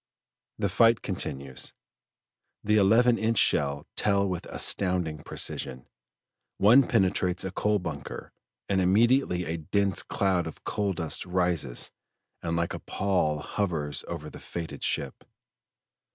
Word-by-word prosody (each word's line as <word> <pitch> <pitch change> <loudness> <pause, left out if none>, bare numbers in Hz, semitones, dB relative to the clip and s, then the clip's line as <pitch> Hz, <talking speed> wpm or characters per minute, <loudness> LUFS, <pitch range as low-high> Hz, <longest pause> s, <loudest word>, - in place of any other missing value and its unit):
The - - 0
fight 115 0 +4
continues. 65 -1 -4 0.9
The 105 +1 +3
eleven 115 +4 +5
inch 115 +1 +1
shell 70 -4 +2
tell 100 -1 +2
with 90 -2 -4
astonishing 90 -5 0
precision; 65 -2 -3 0.7
one 120 +6 +6
penetrates 95 -4 +1
a 95 - -3
coal 105 +2 +1
bunker, 80 -7 -6 0.4
and 95 -1 +1
immediately 100 -1 +3
a 80 +1 -3
dense 100 +4 0
cloud 95 -4 0
of 80 - -10
coal 100 -2 -1
dust 80 -3 -3
rises 90 -8 0 0.5
and 85 -1 -2
like 85 0 -1
a - - -5
pall 90 -6 0
hovers 80 -6 -2
over - - -5
the - - -10
fated 85 -2 -6
ship. 70 -2 -2
90 Hz, 125 wpm, -27 LUFS, 80-100 Hz, 0.9 s, one